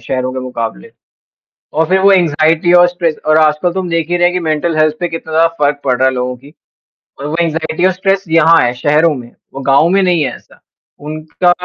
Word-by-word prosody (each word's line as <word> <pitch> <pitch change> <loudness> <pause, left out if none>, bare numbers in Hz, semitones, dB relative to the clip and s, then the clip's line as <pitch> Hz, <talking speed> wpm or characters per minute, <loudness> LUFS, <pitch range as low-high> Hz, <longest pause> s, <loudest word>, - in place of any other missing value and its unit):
शहरों 130 +2 -3
के 130 - -5
मुक़ाबले, 115 - -6 0.8
और 160 +2 0
फिर 190 +1 +2
वो 200 +1 +5
एंग्जायटी 165 -1 +2
और 175 0 +6
स्ट्रेस। 170 -3 -2
और 155 0 +4
आजकल 155 +3 +1
तुम 185 -1 -4
देख 165 -1 -1
ही 175 - 0
रहे 175 - +1
हैं 175 - +1
कि 180 - -1
मेंटल 160 0 -2
हेल्थ 155 0 +2
पे 175 - -1
कितना 165 -1 -7
ज़्यादा 165 +1 +3 0.2
फ़र्क 145 0 0
पड़ 130 -2 +1
रहा 130 - +3
है 130 - -2
लोगों 125 0 -3
की, 140 +5 -18 0.7
और 145 - -5
वो 155 - -3
एंग्जायटी 165 +1 -2
और 190 - +2
स्ट्रेस 195 +1 -1
यहाँ 165 0 +4
है 120 - +1
शहरों 150 +5 +1
में, 120 -3 -10 0.2
वो 135 - -6
गाँव 140 +4 +3
में 195 +2 +2
नहीं 175 -4 +1
है 135 - -3
ऐसा। - - -22 0.4
उनका 155 +4 -2
160 Hz, 225 wpm, -13 LUFS, 145-175 Hz, 0.8 s, और